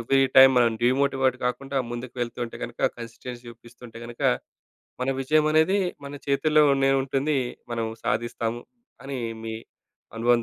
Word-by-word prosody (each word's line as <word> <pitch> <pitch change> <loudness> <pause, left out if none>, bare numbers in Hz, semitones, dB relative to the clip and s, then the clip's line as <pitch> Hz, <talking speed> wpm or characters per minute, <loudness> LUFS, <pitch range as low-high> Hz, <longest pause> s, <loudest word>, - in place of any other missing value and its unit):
ఎవ్రీ‌టైమ్ 135 +2 +6
మనం 120 -1 +4
డీమోటివేట్ 130 +1 +2
గాకుండా 135 +2 -2
ముందుకు 120 +1 -6
వెళ్తుంటే 120 0 -4
గనక 120 0 -9 0.2
కన్సిస్టెన్సీ 120 +1 -8
చూపిస్తుంటే 120 0 -13
గనక 120 0 -9 0.8
మన 130 - 0
విజయం 155 +3 +2
అనేది 160 +6 +4 0.3
మన 140 - -8
చేతుల్లోనే 140 -1 +3
ఉంటుంది. 135 +2 0 0.3
మనం 115 -1 -1 0.2
సాధిస్తాము 120 0 -2 0.4
అని 135 -1 -4 0.3
మీ 110 0 -4 0.6
అనుభవం 120 +1 +3
130 Hz, 120 wpm, -25 LUFS, 120-140 Hz, 0.8 s, ఎవ్రీ‌టైమ్